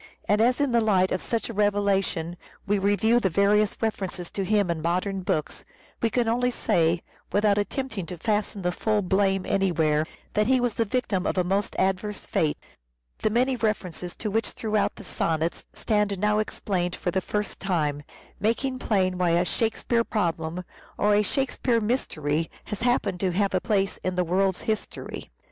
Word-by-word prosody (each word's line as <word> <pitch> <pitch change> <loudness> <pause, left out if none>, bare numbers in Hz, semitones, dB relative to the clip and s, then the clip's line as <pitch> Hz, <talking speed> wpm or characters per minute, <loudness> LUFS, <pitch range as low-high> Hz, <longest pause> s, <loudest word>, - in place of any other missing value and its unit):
And 210 +1 +3
as 245 +4 +3
in 285 -3 +2
the 235 -1 +4
light 190 -4 +3
of 185 - 0
such 230 -3 -2
a 230 - -6
revelation 200 -5 +1 0.3
we 205 0 +1
review 205 +4 +3
the 195 - +1
various 200 +3 +3
references 190 -5 -2
to 195 - -2
him 200 -2 +2
in 165 -2 -3
modern 185 +4 -1
books, 180 -5 -2 0.4
we 230 - +2
can 240 0 +1
only 245 +2 +2
say, 170 -7 +1 0.3
without 205 0 +3
attempt 260 +4 -3
ing 175 - -4
to 180 - -6
fasten 210 +1 -1
the 180 - +1
full 210 +3 0
blame 190 0 +2
anywhere, 160 -5 +1 0.3
that 210 0 +2
he 260 0 +4
was 245 -2 0
the 230 - 0
victim 205 -5 -1
of - - -1
a 180 - +3
most 195 +3 -1
adverse 195 +2 0
fate: 155 -2 0 0.6
the - - +1
many 250 +4 +2
references 185 -6 -2
to 215 - -4
which 225 +2 0
throughout 215 -2 0
the - - -10
sonnets 165 -2 -1
stand 210 -2 0
now 210 +2 +2
explained 185 -4 -1
for 175 - -2
the 190 - 0
first 210 +1 -3
time, 155 -7 0 0.4
making 255 +5 0
plain 185 -6 +1
why 180 -1 +3
a 175 - +2
Shakespeare 230 +3 0
Problem, 170 -5 -2 0.3
or 210 0 +3
a 205 - +5
Shakespeare 250 0 0
Mystery, 165 - -1
has 210 - -6
happened 220 -6 +1
to 185 -2 0
have 200 +1 +1
a 185 - +2
place 195 -4 0
in 185 0 -1
the 180 - +2
world's 190 +2 +1
history. 220 -2 -4
200 Hz, 180 wpm, -26 LUFS, 180-220 Hz, 0.6 s, a